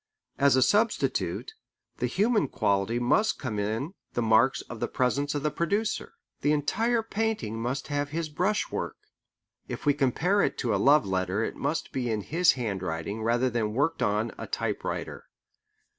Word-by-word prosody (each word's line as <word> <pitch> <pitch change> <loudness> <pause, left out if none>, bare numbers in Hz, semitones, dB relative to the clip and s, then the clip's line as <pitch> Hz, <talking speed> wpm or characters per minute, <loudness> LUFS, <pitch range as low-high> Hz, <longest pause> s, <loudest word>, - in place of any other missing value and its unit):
As 140 -1 +5
a 130 - +5
substitute, 220 - +1 0.4
the - - 0
human 210 - +2
quality 100 0 0
must 165 - +2
come 110 -6 -3
in 110 - -2 0.2
the 120 - 0
marks 115 +4 +4
of 120 - -9
the - - -1
presence 140 +3 0
of 145 - -2
the 150 - +1
producer. 205 +8 -1 0.3
The 145 - +3
entire 225 +11 +1
painting 215 - -2
must 130 +5 -3
have 145 0 -1
his 160 +1 -2
brushwork. 180 +8 -1 0.7
If - - -6
we 145 - +5
compare 160 +9 +2
it - - 0
to 120 -4 0
a - - +2
love 145 +3 +5
letter 95 +2 0
it - - -3
must 145 +3 -2
be 125 -2 -2
in 110 -2 -1
his 165 - +3
handwriting 100 -4 -3
rather 120 +3 +2
than 110 -2 -1
worked 145 +5 +1
on 105 +3 +1
a - - -5
typewriter. - - -3
135 Hz, 165 wpm, -28 LUFS, 110-165 Hz, 0.7 s, As